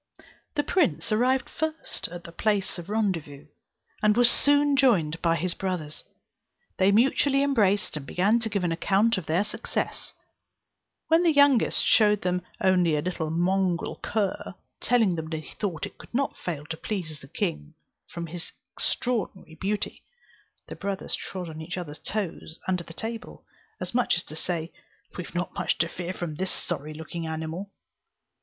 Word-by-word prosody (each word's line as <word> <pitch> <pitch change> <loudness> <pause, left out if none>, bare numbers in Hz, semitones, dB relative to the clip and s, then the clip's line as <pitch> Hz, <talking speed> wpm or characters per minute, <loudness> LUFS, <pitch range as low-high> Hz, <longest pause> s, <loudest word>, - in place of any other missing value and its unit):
The 290 - +2
prince 340 -10 +1
arrived 255 +4 +3
first 315 0 -3
at 175 0 -8
the 170 - -9
place 200 0 0
of 175 +2 -9
rendezvous, 170 -10 -1 0.6
and 210 +1 +4
was 245 -1 +7
soon 285 0 +4
joined 180 - +3
by 165 -1 +3
his 170 +2 -1
brothers; 180 -6 -3 0.7
they 190 +1 +5
mutually 270 +5 +4
embraced, 205 - +2
and 150 - -4
began 200 +10 +2
to 225 -1 -2
give 200 -3 -1
an 175 - +1
account 195 +5 +3
of 170 - -10
their 170 +5 +3
success; 220 +2 -3 0.9
when 325 +1 +6
the 340 -2 +5
youngest 285 -5 +5
showed 210 -2 +5
them 180 0 +1 0.2
only 180 -4 +4
a 150 - +1
little 175 -3 -2
mongrel 180 +1 +1
cur, 205 -3 -1 0.2
telling 225 -7 +3
them 160 -1 -4
he 155 -1 -5
thought 180 -7 -1
it - - -11
could - - -11
not 275 +2 +1
fail 155 -5 -4
to 160 - -3
please 165 -6 -4
the 135 - -13
king 75 - -3 0.3
from 170 0 -5
its 170 +1 -7 0.2
extraordinary 210 -8 -1
beauty, 200 +6 -2 0.6
the - - -8
brothers 200 -1 -3
trod 185 -2 -4
on 160 -1 -7
each 170 +3 -5
other's 155 -4 -6
toes 185 -6 -3
under 180 -2 +1
the 165 - -12
table; 225 +5 -6 0.3
as - - -3
much 245 -6 +3
as 170 - -3
to 155 - -9
say, 165 0 -2 0.4
we 180 - -3
have 170 - -13
not 175 -2 -1
much - - 0
to 160 - +2
fear 175 +1 -5
from 175 -4 -4
this 185 +5 -2
sorry 155 -3 -3
looking 160 +1 -5
animal. 160 +5 -4
185 Hz, 170 wpm, -27 LUFS, 165-220 Hz, 0.9 s, was